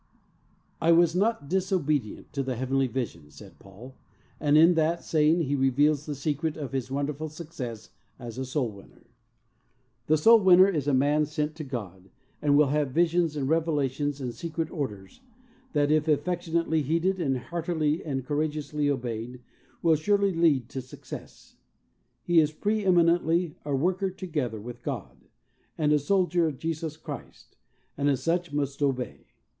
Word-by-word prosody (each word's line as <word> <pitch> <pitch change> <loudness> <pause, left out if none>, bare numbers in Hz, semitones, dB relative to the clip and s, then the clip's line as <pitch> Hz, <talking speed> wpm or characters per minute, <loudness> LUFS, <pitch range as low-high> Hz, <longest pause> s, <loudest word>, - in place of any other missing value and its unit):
"I 165 +1 +5
WAS 170 0 +4
not 200 -6 0
disobedient 160 - -1
to 140 - -1
the 130 -1 -3
heavenly 130 +2 0
vision," 115 - -5
said - - -14
Paul, 105 +7 -13 0.5
and 150 0 +3
in 165 +3 +7
that 165 +1 +1
saying 155 +2 +3
he 145 -3 -1
reveals 140 +3 +2
the 145 - -3
secret 150 +3 -2
of 145 -4 -5
his 130 -2 -3
wonderful 145 +3 -3
success 135 -9 -8 0.3
as 120 -1 -8
a 130 - -2
soul 130 -3 -1
winner. 100 -1 -16 1.0
The 155 - +4
soul 225 +9 +7
winner 185 -1 +7
is 155 -8 -1
a 145 - +2
man 145 +3 +2
sent 150 0 -2
to 155 - -5
God, 100 - -7 0.3
and 145 -1 +3
will 150 -2 +4
have 145 -1 +1
visions 170 +2 +1
and 140 -3 -2
reve 160 +2 +1
lations 145 -1 -1
and 125 -3 -4
secret 165 0 -4
orders 105 - -6 0.5
that, 145 -1 +2
if 155 0 +2
affection 165 +3 -1
ately 160 -2 +2
heeded 170 +6 0
and 135 -5 0
heartily 160 +1 -2
and 135 -4 -3
courageously 150 0 -1
obeyed, 125 -2 -3 0.4
will 165 -2 +5
surely 200 +5 +1
lead 155 -8 +2
to 135 - -5
success. 130 - -11 0.7
He 175 -1 +4
is 155 -1 +3
pre 210 +7 -1
eminently 170 -2 +3
"a 145 -2 -1
worker 185 +7 0
together 155 - -4
with 120 +3 -9
God," 60 +1 -6 0.5
and 150 -2 +2
a 150 - +4
soldier 175 +1 +2
of 145 -4 -4
Jesus 160 0 -4
Christ, - - -10 0.4
and 145 0 +1
as 135 -3 0
such 175 0 0
must 140 -1 -2
obey. 130 -3 -2
150 Hz, 160 wpm, -27 LUFS, 135-165 Hz, 1.0 s, in